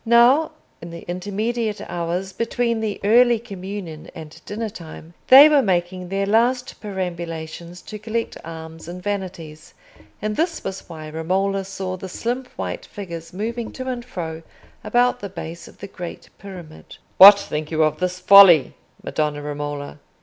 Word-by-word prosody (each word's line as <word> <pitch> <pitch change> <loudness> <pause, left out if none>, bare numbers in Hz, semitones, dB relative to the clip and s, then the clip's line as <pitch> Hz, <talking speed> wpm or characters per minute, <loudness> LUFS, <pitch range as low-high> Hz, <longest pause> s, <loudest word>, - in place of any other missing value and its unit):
Now, 245 +7 +4 0.3
in 170 - -8
the 170 0 -9
intermediate 210 +5 -2
hours 175 +3 -3
between 230 +1 -1
the 215 -2 -3
early 240 +3 +5
communion 195 -6 -8
and 155 -1 -11
dinner 220 +2 -4
time, 165 -3 -11
they 275 +3 +10
were 300 -2 +4
making 180 -3 -1
their 195 +1 -1
last 240 +5 +1
perambulations 170 -3 -6
to 210 - -8
collect 225 +2 -3
alms 160 0 -9
and 180 +1 -8
vanities, 180 -6 -6 0.4
and 210 0 -3
this 330 +4 -1
was 190 0 -6
why 155 -1 -8
Romola 190 +5 -1
saw 190 -1 -5
the 190 +1 -8
slim 245 +7 -3
white - - -5
figures 170 -5 -8
moving 225 +5 -4
to 260 0 -6
and 250 -2 -3
fro 165 -9 -6 0.4
about 245 +1 +2
the 200 - -6
base 170 -2 -8
of - - -16
the 200 - -8
great 180 -3 -9
pyramid. 180 -6 -11 0.2
"What 200 +2 +11
think 155 -6 -4
you 160 -1 +1
of 155 0 0
this 180 0 -1
folly, 185 -6 +8 0.3
Madonna 150 -1 -2
Romola?" 145 0 -5
190 Hz, 155 wpm, -22 LUFS, 165-220 Hz, 0.4 s, What